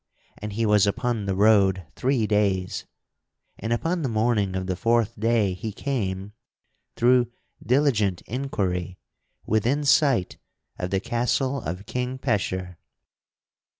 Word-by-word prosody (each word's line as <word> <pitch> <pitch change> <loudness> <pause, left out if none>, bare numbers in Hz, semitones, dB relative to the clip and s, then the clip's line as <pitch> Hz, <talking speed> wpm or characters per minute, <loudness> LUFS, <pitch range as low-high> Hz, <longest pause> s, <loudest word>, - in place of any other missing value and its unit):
And 105 -1 -5
he 115 +2 0
was 105 -1 +4
upon 115 -1 -1
the 95 - 0
road 100 -3 +4
three 130 -3 +1
days, 100 -3 0 0.7
and 110 - -4
upon 165 +9 0
the 135 - -1
morning 110 -4 +1
of 95 0 -2
the 90 0 -2
fourth 115 +2 +1
day 110 -3 +2
he 100 +5 -5
came, 100 -6 -3 0.6
through 120 0 +3 0.3
diligent 120 -9 +2
inquiry, 95 -8 -3 0.5
within 120 +7 +1
sight 140 - +3 0.4
of 90 - -2
the 95 +1 +1
castle 125 +5 0
of 90 +3 -5
King 125 +2 -3
Pecheur. 95 -8 -2
110 Hz, 125 wpm, -25 LUFS, 95-125 Hz, 0.7 s, was